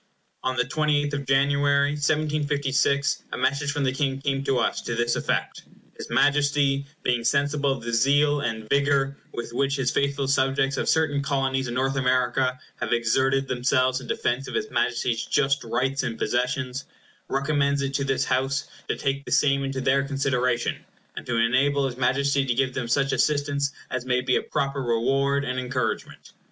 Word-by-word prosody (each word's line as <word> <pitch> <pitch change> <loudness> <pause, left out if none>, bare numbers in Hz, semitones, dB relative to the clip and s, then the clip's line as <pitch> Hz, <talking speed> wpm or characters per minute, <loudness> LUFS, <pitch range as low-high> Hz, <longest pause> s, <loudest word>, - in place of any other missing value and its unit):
On 130 0 -1
the - - +2
28th 150 +1 0
of 140 -1 -3
January, 140 +1 +3
1756, 145 -1 0
a - - -3
message 140 +3 0
from 145 -1 -2
the 130 - +2
King 135 0 -1
came 135 -1 -1
to 135 - +1
us, - - 0
to 120 - -4
this 120 +1 +1
effect: - - -2 0.3
"His - - -8
Majesty, 145 -1 +2 0.2
being 120 -1 +1
sensible 140 +3 +1
of 130 -4 -8
the 120 0 -4
zeal 145 +5 +3
and 110 -3 -3
vigor 140 +1 +2 0.2
with 120 0 -6
which 140 +2 +1
his 130 -2 0
faithful 140 -1 0
subjects 135 0 +1
of - - -1
certain 155 -3 +2
Colonies 135 -2 -1
in 120 - -4
North 135 +1 0
America 125 0 +1 0.2
have - - -3
exerted 130 +3 +2
themselves 130 +1 +1
in 125 - -10
defence 125 +4 -1
of - - -6
his 430 0 -2
Majesty's 120 -1 0
just 140 +1 +1
rights 130 +4 -1
and 120 -4 -3
possessions, 125 +1 -1 0.4
recommends 140 0 0
it 135 0 -3
to 140 - 0
this 135 -1 0
House 135 +2 0 0.2
to - - -1
take 140 0 -2
the - - -9
same 140 -1 +3
into 135 -1 -3
their 135 +1 +3
consideration, 130 -3 0 0.4
and - - -8
to 120 - 0
enable 135 +5 +2
his 130 -2 -3
Majesty 140 +2 +1
to 125 -3 -1
give 130 0 0
them 125 -2 -3
such 135 +3 +1
assistance 145 -1 +1 0.2
as 130 -1 -2
may 125 0 +1
be 125 0 +1
a - - +2
proper 140 0 -2
reward 135 +4 +1
and 130 -1 -2
encouragement." 125 -2 -3
135 Hz, 180 wpm, -25 LUFS, 125-140 Hz, 0.4 s, January